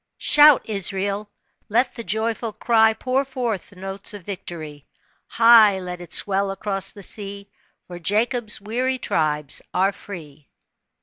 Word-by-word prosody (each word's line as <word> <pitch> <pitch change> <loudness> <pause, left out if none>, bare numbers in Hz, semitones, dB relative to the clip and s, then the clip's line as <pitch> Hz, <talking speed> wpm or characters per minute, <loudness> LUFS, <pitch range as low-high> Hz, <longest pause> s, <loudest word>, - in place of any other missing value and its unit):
" - - -59
Shout, 295 -2 +6
Israel. 200 0 -2 0.4
Let 245 +5 +1
the 230 - -7
joyful 225 +1 -2
cry 220 0 +3
Pour 255 +4 0
forth 250 -7 -4
the 200 - -18
notes 195 +2 -6
of 200 - -10
victory, 160 -6 -8 0.4
High 230 -4 +6
let 180 -1 -7
it 175 -2 -11
swell 195 0 +1
across 195 0 -2
the 200 - -11
sea, 200 0 -5 0.3
For 175 -1 -9
Jacob's 220 +5 0
weary 250 +5 -1
tribes 150 - -1
are 190 +2 +3
free." 155 -8 -11
205 Hz, 140 wpm, -22 LUFS, 185-230 Hz, 0.4 s, Shout